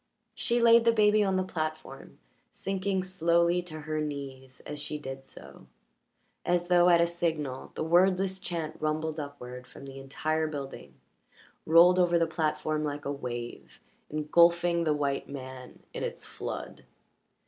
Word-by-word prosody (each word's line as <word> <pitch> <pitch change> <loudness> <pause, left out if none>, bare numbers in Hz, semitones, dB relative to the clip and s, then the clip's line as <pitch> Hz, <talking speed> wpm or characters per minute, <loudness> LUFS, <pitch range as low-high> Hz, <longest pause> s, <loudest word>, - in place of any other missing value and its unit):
She 240 +1 +1
laid 235 0 +6
the 230 - +5
baby 215 -1 +4
on 195 -1 +1
the 185 - +1
platform, 155 -6 -5 0.3
sinking 195 0 -2
slowly 170 -1 +2
to 155 -3 -9
her 155 0 -2
knees 135 -3 -6
as 150 - -7
she 150 +1 -4
did 135 -2 -8
so; - - -13 0.8
as 175 0 0
though 175 0 +6
at 170 -1 +6
a 170 - +5
signal 160 -6 -3
the - - -2
wordless 185 +3 +3
chant 170 -4 -4
rumbled 155 +1 -1
upward 125 -4 -8
from 140 - -12
the 135 0 -9
entire 155 +4 -1
building, 140 -3 -7 0.7
rolled 175 +3 +7
over 175 -1 +4
the 165 - +3
platform 155 -1 -1
like 145 -1 -4
a 140 - -1
wave, 120 -4 -6 0.3
engulfing 170 +3 +3
the 155 - +3
white 140 -1 -2
man 130 -2 -9
in - - -4
its - - -5
flood. - - -7
155 Hz, 150 wpm, -29 LUFS, 145-175 Hz, 0.8 s, rolled